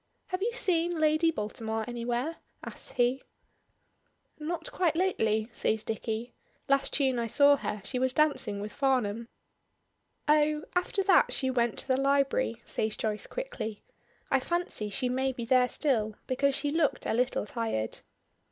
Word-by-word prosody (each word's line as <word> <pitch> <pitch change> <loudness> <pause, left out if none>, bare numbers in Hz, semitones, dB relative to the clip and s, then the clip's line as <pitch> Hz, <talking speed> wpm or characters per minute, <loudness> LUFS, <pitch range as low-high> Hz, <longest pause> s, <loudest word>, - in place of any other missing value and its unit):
"Have 370 0 -2
you 465 +3 0
seen 345 -6 +1
Lady 310 +1 +3
Baltimore 220 -4 -3
anywhere?" 245 +6 -2 0.3
asks - - -7
he. 245 +2 +2 1.2
"Not 340 +10 -4
quite 350 -8 +1
lately," 220 - +1
says 220 0 0
Dicky; 225 +2 -3 0.3
"last 275 0 +2
tune 265 -4 +2
I 230 - -1
saw 285 +5 +6
her 210 -6 -4
she 255 - -2
was 260 0 +1
dancing 280 -8 +1
with 210 +1 -6
Farnham." 235 -5 0 1.0
"Oh 300 0 +3
after 360 +2 +1
that 380 0 +5
she 260 -1 +1
went 240 -3 +1
to - - -2
the 260 -1 +2
library," 270 -4 +1
says 215 -1 -2
Joyce 215 -1 -2
quickly. 225 - -5 0.5
"I 270 - +4
fancy 345 -8 -2
she 250 +5 -1
may 260 +1 0
be 240 -2 -5
there 250 +1 +4
still, 225 -8 0
because 275 +1 +1
she 290 +1 0
looked 315 -1 +1
a - - 0
little 250 -1 +1
tired." 215 - -2
260 Hz, 150 wpm, -29 LUFS, 225-305 Hz, 1.2 s, saw